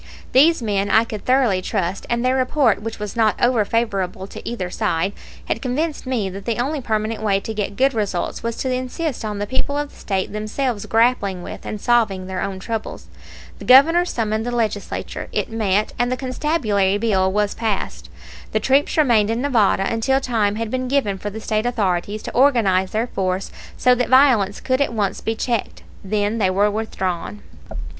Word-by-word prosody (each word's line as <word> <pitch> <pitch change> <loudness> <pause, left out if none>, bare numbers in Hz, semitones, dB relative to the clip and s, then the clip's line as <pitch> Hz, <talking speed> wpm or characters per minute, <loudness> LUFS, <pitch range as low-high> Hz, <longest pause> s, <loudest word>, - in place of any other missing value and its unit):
These 295 +1 +5
men 200 -2 0
I 220 +3 +5
could 215 -3 -7
thoroughly 250 -8 +3
trust, 190 -1 -2
and 235 +1 0
their 255 +1 +3
report, 260 -4 +2
which 225 +1 -5
was 210 0 -6
not 220 -2 +3
over 240 -3 +3
favorable 195 -4 -1
to - - -8
either 185 -7 -4
side, 180 +4 -1 0.3
had - - -2
convinced 285 +3 -2
me 240 -6 0
that 195 +1 -8
the 230 -2 -1
only 275 +4 -1
permanent 220 -1 -2
way 200 -2 +2
to 220 - -5
get 205 -2 -3
good 270 +4 +3
results 205 -5 -2
was 230 0 -3
to 260 -1 -1
insist 255 +3 -3
on 210 -1 -3
the 205 - -2
people 260 +5 -1
of 290 0 -3
the - - -19
State 190 -1 -3
themselves 215 +1 -2
grappling 225 -6 +2
with - - -8
and 215 - -4
solving 220 -5 +1
their 185 0 -4
own 195 -1 -3
troubles. 220 +3 -5 0.5
The - - -9
Governor 315 +7 +7
summoned 220 -7 -1
the 240 - -3
Legislature, 220 -4 -3
it - - -2
met, 215 -2 0
and 245 +1 +1
the 255 - -1
constabulary 250 -8 0
bill 195 -4 +1
was 205 +1 0
passed. 220 -4 -3 0.4
The - - +2
troops 275 +4 +2
remained 235 -9 +4
in 225 +1 0
Nevada 220 -8 +2
until 250 +4 +1
time 220 -6 0
had 225 0 -3
been 255 0 -2
given 250 -8 0
for 205 - -4
the 215 +2 -7
State 215 +1 -1
authorities 205 -3 -1
to - - -5
organize 225 -8 +3
their 220 +4 -1
force 190 -4 -2 0.3
so 250 - +4
that 250 -1 0
violence 250 -7 +4
could 260 +1 0
at 280 - +1
once 205 -4 -1
be 225 - -2
checked. 235 0 -2 0.2
Then 205 +2 -1
they 190 -3 +3
were 200 +3 +2
withdrawn. 205 -2 -3
220 Hz, 190 wpm, -21 LUFS, 200-250 Hz, 0.5 s, Governor